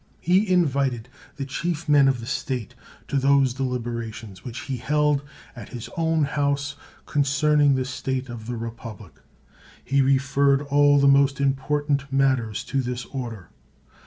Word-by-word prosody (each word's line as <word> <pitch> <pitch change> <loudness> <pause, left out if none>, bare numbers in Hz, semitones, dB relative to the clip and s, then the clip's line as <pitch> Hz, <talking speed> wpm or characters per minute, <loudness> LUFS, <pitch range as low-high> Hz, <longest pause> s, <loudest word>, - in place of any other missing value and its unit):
He 185 +4 +2
invited 135 -8 +1 0.3
the 140 - -4
chief 170 +4 -3
men 145 -2 +5
of 130 -3 +1
the - - -7
state 125 -3 -3 0.3
to 140 - -1
those 135 -1 +3
deliberations 115 -5 -5
which 125 0 -6
he 135 -2 -4
held 150 +2 +1 0.3
at 115 -5 -9
his 120 -1 -8
own 160 -2 +1
house 140 0 -1 0.3
concerning 145 0 +3
the 130 -1 -1
state 130 0 -3
of 115 -2 -8
the 120 -1 -4
republic; 115 -5 -8 0.7
he 140 +1 +2
referred 135 +1 +2
all 145 0 +4
the 140 0 +4
most 140 0 +4
important 140 +1 0
matters 130 -6 +1
to 135 0 -1
this 125 -1 -4
order. 115 -8 -7
135 Hz, 145 wpm, -24 LUFS, 125-145 Hz, 0.7 s, men